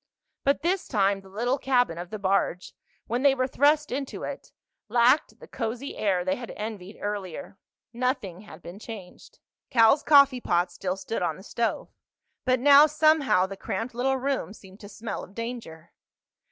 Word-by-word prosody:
But 280 +2 +1
this 360 +2 0
time 200 -3 +1
the 195 - -16
little 240 +7 -1
cabin 245 -11 +1
of 175 0 -7
the 215 - -5
barge, 190 -2 -1 0.3
when 240 +3 -2
they 275 -1 +5
were 255 -1 +1
thrust 295 +3 +2
into 270 +1 -4
it, - - -7 0.4
lacked 245 +5 +3
the - - -13
cozy 240 +5 -4
air 185 -4 0
they 185 - 0
had 240 -2 -8
envied 210 -2 -7
earlier. 200 -2 -5 0.3
Nothing 235 -7 -2
had 205 -4 -14
been 180 +4 -9
changed. 210 -5 -11 0.3
Cal's 235 +3 +5
coffeepot 255 - +4
still 180 +2 -3
stood 225 +3 -4
on 175 - -1
the 190 - -13
stove. 230 +2 -3 0.5
But 255 -1 +2
now, 285 +3 +8
somehow, 305 -10 +3
the 195 +1 -7
cramped 230 +5 -4
little 265 +3 0
room 265 -5 -2
seemed 190 -2 -15
to 205 - -11
smell 220 +2 -6
of 195 - -14
danger. 230 -9 -7
230 Hz, 165 wpm, -26 LUFS, 195-265 Hz, 0.5 s, now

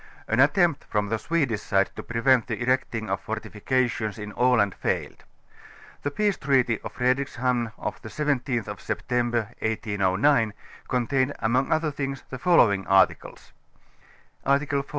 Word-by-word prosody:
An 110 - 0
attempt 145 +2 +3
from 105 -1 -1
the 110 0 -1
Swedish 140 -10 0
side 95 -1 +1
to - - -5
prevent 115 +1 +2
the 110 -3 -3
erecting 120 -3 -1
of 95 -1 -2
fortifications 110 +1 -2
in 105 -1 -7
Aland 120 -5 +3
failed^ - - -2 0.8
The 145 - -1
peace 205 +6 0
treaty 130 -5 +2
of - - -8
Fredrikshamn 125 -2 0
of - - -5
the 110 - -8
17th 135 -4 -1
of 105 -2 -6
Sept. 125 - -5
1809 110 -1 +1 0.3
contained 130 +2 0
among 125 +4 0
other 155 -1 +1
things 135 -1 -4
the 130 - -5
following 110 - +4
articles: 95 -1 +1 0.9
Article 140 +1 +1
TV. 140 - -16
125 Hz, 140 wpm, -25 LUFS, 110-140 Hz, 0.9 s, following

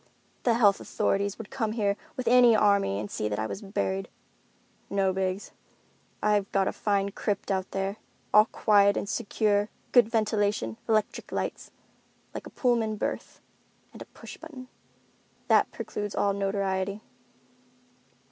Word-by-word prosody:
"The 235 -2 +4
health 205 -4 +4
authorities 200 0 -1
would 225 -3 -9
come 220 -4 -1
here 205 -3 +1 0.2
with 255 - -3
an 245 -1 +7
army 200 - +3
and 105 -1 -6
see 105 - -2
that 105 - -2
I 110 - -1
was 190 - -5
buried. 95 - -2 0.8
No, 195 -1 +1
Biggs, 190 +1 -2 0.7
I've 205 -2 +2
got 195 -1 +2
a - - +1
fine 200 -1 0
crypt 205 0 -2
out 190 -1 -1
there, 195 +1 -3 0.4
all 210 0 +8
quiet 200 -3 +3
and - - -2
secure, 210 -1 0 0.2
good 240 -3 +6
ventilation, 205 - 0
electric 215 -2 0
lights, - - -3 0.6
like - - -6
a - - -10
pullman 235 -4 +1
berth—and - - -8
a - - -7
push - - -12
button. 270 -6 -11 0.8
That - - +4
precludes 205 -1 -5
all 200 -1 +2
notoriety. 195 0 -1
205 Hz, 140 wpm, -27 LUFS, 195-215 Hz, 0.8 s, all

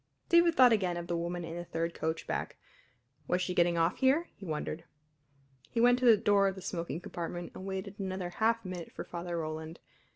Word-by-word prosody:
David 340 -1 +5
thought 250 -2 +7
again 185 -5 +1
of 170 - -4
the 175 0 -2
woman 170 +1 -3
in 165 0 -6
the 175 - -4
third 165 0 -3
coach 160 +1 -3
back. - - -3 0.7
Was 180 - +1
she 180 0 -1
getting 170 -1 +3
off 165 +1 +2
here, 280 +6 +3
he 195 - -10
wondered? 155 +1 -3 0.9
He 230 - -2
went 245 +1 +5
to 255 - 0
the 230 -3 +8
door 200 -1 +3
of 190 - -1
the 190 - -9
smoking 170 -3 -3
compartment 175 0 -5
and 190 - -8
waited 195 +2 -5
another 185 -2 -3
half 225 +3 +1
minute 180 -2 -6
for - - -6
Father 175 0 -5
Roland. 160 0 -5
180 Hz, 205 wpm, -31 LUFS, 170-205 Hz, 0.9 s, the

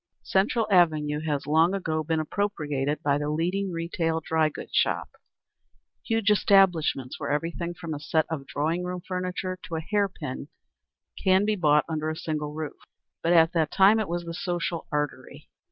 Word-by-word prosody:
Central 215 +4 +1
Avenue 155 -5 +3
has 145 -2 -1
long 160 +5 +3
ago 160 -5 -1
been 160 +1 0
appropriated 150 -5 -2
by 145 0 +2
the 145 0 -2
leading 180 +5 -1
retail 165 -1 -1
dry 160 -1 +1
goods 145 - -10
shops, - - +1 0.9
huge 225 -2 +1
establishments 180 - +3
where - - -4
everything 170 +3 -2
from 165 -2 -6
a 145 - -5
set 155 +2 +1
of 145 -4 -5
drawing 165 +5 -1
room 180 0 -4
furniture 185 0 -3
to 165 - -6
a - - -1
hair 205 +3 +1
pin 145 -6 -6 0.8
can 190 +1 +4
be 215 0 +1
bought 150 -5 +3
under 155 -1 -2
a 155 - -3
single 155 -3 -3
roof; 155 0 -6 0.4
but 170 - +1
at 165 0 +5
that 160 -3 +1
time 200 +3 +5
it 215 - -2
was 175 0 -2
the 170 - -5
social 175 -1 -3
artery. 145 -1 -4
165 Hz, 170 wpm, -26 LUFS, 150-185 Hz, 0.9 s, at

